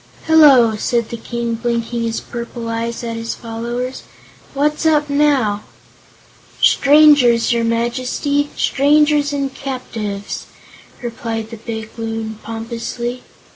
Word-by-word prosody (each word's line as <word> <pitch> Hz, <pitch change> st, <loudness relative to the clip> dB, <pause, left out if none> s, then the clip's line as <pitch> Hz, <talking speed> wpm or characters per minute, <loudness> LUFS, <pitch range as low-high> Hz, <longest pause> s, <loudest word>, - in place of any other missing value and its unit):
"Hello," 280 Hz, -8 st, +6 dB
said 235 Hz, +1 st, 0 dB
the -, -, -4 dB
King, 235 Hz, 0 st, -3 dB
blinking 235 Hz, 0 st, -2 dB
his 230 Hz, 0 st, -1 dB
purple 235 Hz, 0 st, -6 dB
eyes 230 Hz, +1 st, -3 dB
at 230 Hz, -1 st, -4 dB
his 230 Hz, 0 st, -4 dB
followers; 240 Hz, +2 st, -5 dB, 0.5 s
"what's 300 Hz, +3 st, 0 dB
up 300 Hz, -2 st, +2 dB
now!" 275 Hz, -8 st, +2 dB, 1.0 s
"Strangers, 280 Hz, -6 st, +5 dB
your 235 Hz, -1 st, +1 dB
Majesty 250 Hz, +5 st, 0 dB
strangers 295 Hz, +1 st, +3 dB
and 275 Hz, -2 st, -2 dB
captives," 220 Hz, -7 st, -5 dB, 0.6 s
replied 225 Hz, -1 st, -4 dB
the 230 Hz, -, -7 dB
big 220 Hz, 0 st, -6 dB
Loon, 225 Hz, -1 st, -4 dB
pompously. 235 Hz, +2 st, -5 dB
235 Hz, 110 wpm, -18 LUFS, 230-275 Hz, 1.0 s, Hello